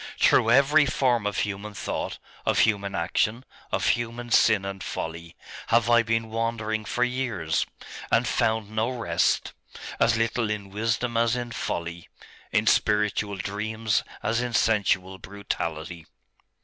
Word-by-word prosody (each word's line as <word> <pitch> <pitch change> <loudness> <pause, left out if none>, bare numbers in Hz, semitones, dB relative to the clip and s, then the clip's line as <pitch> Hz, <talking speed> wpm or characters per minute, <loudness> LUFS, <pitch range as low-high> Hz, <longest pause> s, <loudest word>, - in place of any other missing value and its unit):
Through 115 - +4
every 140 +4 +5
form 125 -5 +1
of 105 - -3
human 105 +1 -3
thought, - - -3 0.3
of - - +1
human 100 -3 +1
action, 110 +8 0 0.3
of - - +1
human 120 0 -2
sin 110 -4 +4
and 95 -2 -5
folly, 85 +1 -6 0.3
have 115 0 +3
I 120 0 +6
been 115 -1 -1
wandering 110 -1 -2
for 125 - 0
years, 125 -11 -1 0.4
and - - +3
found 110 -2 0
no 110 +2 0
rest 115 -10 0 0.5
as 115 -1 +3
little 115 0 0
in 100 -2 -4
wisdom 115 +3 -1
as 115 +1 +2
in 120 -1 -4
folly, 85 -6 -4 0.4
in - - +2
spiritual 105 -1 +2
dreams 110 +3 -1 0.2
as 115 +1 +1
in 125 -1 -3
sensual 95 -4 +1
brutality. 85 -5 -5
110 Hz, 135 wpm, -26 LUFS, 100-115 Hz, 0.5 s, I